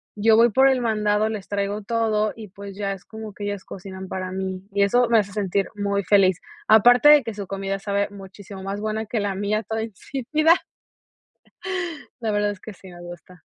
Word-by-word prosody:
yo 220 +1 +4
voy 235 0 +5
por 265 +5 +5
el 260 -2 +1
mandado, 215 -1 +1
les 205 -4 -5
traigo 205 +1 -2
todo 215 -1 0
y 215 -3 -10
pues 200 0 -10
ya 200 -1 -2
es 185 -2 -11
como 220 -1 -9
que 205 - -7
ellas 205 -2 -4
cocinan 190 0 -8
para 185 -1 -4
mí 190 0 -4
y 200 - +3
eso 245 +5 +3
me 230 - +5
hace 205 -1 -2
sentir 200 -1 0
muy 200 -1 -1
feliz. 190 -1 +4 0.3
Aparte 245 +5 +6
de 295 -3 +8
que 225 - -5
su 200 -2 -7
comida 195 0 -3
sabe 200 0 -1
muchísimo 195 0 -11
más 195 +2 -4
buena 215 +1 -2
que 225 +1 -2
la 200 -1 -2
mía, 205 +2 -1
toda 220 +2 -3
insípida. 275 - +1 1.7
La 225 -2 -1
verdad 205 0 +1
es 205 - -7
que 220 - -9
sí 190 0 -15
me 175 -1 -12
gusta. 175 0 -12
205 Hz, 205 wpm, -23 LUFS, 195-220 Hz, 1.7 s, de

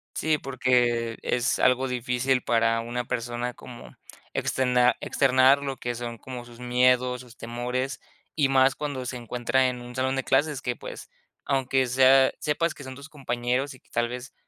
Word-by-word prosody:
Sí, 155 -1 +1
porque 120 -3 +1
es 125 0 0
algo 130 +1 +3
difícil 125 +1 0
para 115 -1 +2
una 120 +1 -3
persona 120 0 -3
como 120 -1 -12 0.4
extena 125 -1 +2
externar 135 +1 +4
lo 135 -2 -4
que 120 - -3
son 120 0 -5
como 125 +1 -8
sus 120 -1 -15
miedos, 125 0 +2
sus 125 -1 -16
temores, 125 +3 -3 0.4
y 145 -4 +2
más 135 0 +4
cuando 140 -4 -4
se 125 - -4
encuentra 125 +2 0
en 125 -1 -4
un 120 0 -10
salón 130 +1 0
de 135 - -1
clases, 140 +1 +1
que, 125 -1 -2
pues, - - -9 0.4
aunque 135 -1 +1
sea 130 +1 +5
sepas 155 +2 0
que 140 - -11
son 130 -1 -8
tus 140 +3 -12
compañeros 125 -1 -2
y - - -18
que, - - -32
tal 120 0 +1
vez, 125 +2 -7
125 Hz, 175 wpm, -26 LUFS, 120-135 Hz, 0.4 s, sea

